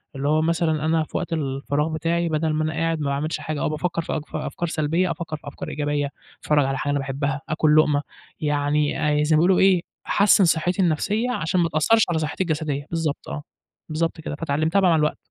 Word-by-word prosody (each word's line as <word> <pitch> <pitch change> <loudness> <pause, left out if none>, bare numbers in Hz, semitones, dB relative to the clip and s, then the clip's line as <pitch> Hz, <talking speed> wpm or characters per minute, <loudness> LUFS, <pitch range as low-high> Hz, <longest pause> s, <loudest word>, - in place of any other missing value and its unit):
اللي 135 +1 -2
هو 155 +1 +3
مثلًا 160 -2 +1
أنا 160 0 +2
في - - -5
وقت 170 -1 -3
الفراغ 145 0 -1
بتاعي 170 +2 0
بدل 155 0 0
ما 155 0 0
أنا 155 - -1
قاعد 165 0 -1
ما 150 - -2
باعملش 145 +3 -2
حاجة 155 -2 -4
أو - - +1
بافكّر 165 +2 -2
في - - -4
أك 155 - -2
أفكار 175 - -3
سلبية، 165 +4 0
أفكّر 160 -1 -5
في - - -16
أفكار 145 - -7
إيجابية 145 -1 -1 0.3
أتفرّج 150 -2 +2
على 135 0 -1
حاجة 145 - -1
أنا 145 - +1
باحبها، 135 +1 -2
آكل 155 -1 +3
لقمة 150 -2 +4 0.4
يعني 150 0 +1
زي 155 0 +3
ما - - +4
بيقولوا 180 +3 +4
إيه 190 -2 +5 0.3
أحسِّن 200 -1 +5
صحّتي 175 +4 +1
النفسية 205 +9 +1
عشان 175 -3 0
ما 165 - +1
تأثّرش 185 +9 +3
على 160 - +1
صحتي 155 +4 -2
الجسدية، 150 -4 -2
بالضبط 160 -3 -2
آه، 150 - -5 0.5
بالضبط 165 +1 -2
كده 150 -2 -5
فاتعلّمتها 155 +4 0
بقى 185 - +4
مع 165 - +4
الوقت. 150 0 +1
155 Hz, 210 wpm, -23 LUFS, 150-165 Hz, 0.5 s, إيه